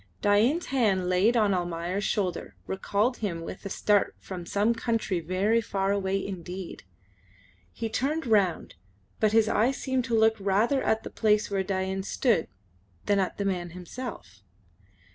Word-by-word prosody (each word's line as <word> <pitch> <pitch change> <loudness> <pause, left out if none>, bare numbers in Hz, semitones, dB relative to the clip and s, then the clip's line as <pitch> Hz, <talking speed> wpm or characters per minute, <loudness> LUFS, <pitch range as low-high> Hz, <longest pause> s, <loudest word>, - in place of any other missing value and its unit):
Dain's 230 +12 +3
hand 205 -9 +1
laid 200 +7 +3
on 210 -3 +3
Almayer's 175 +2 -2
shoulder 195 -5 -2
recalled 205 +5 0
him 180 -6 -3
with - - -8
a - - -6
start 205 +1 +1
from 180 -3 -8
some 205 +5 +2
country 230 -5 -1
very 190 +7 +1
far 195 -2 -1
away 195 -1 0
indeed. 185 -1 -6 0.9
He 225 - -4
turned 280 +8 -1
round, 200 -7 +1 0.5
but 215 -1 +3
his 220 0 +4
eyes 230 +5 +2
seemed 260 -2 -1
to 235 -3 +1
look 220 0 +4
rather 205 +8 +2
at 220 0 +1
the - - -7
place 210 -2 +2
where 195 -1 +1
Dain 190 0 -2
stood 210 -2 +1 0.6
than 200 -1 +2
at 190 - -1
the 200 - -2
man 180 -3 -1
himself. 180 - -8
200 Hz, 155 wpm, -27 LUFS, 190-225 Hz, 0.9 s, his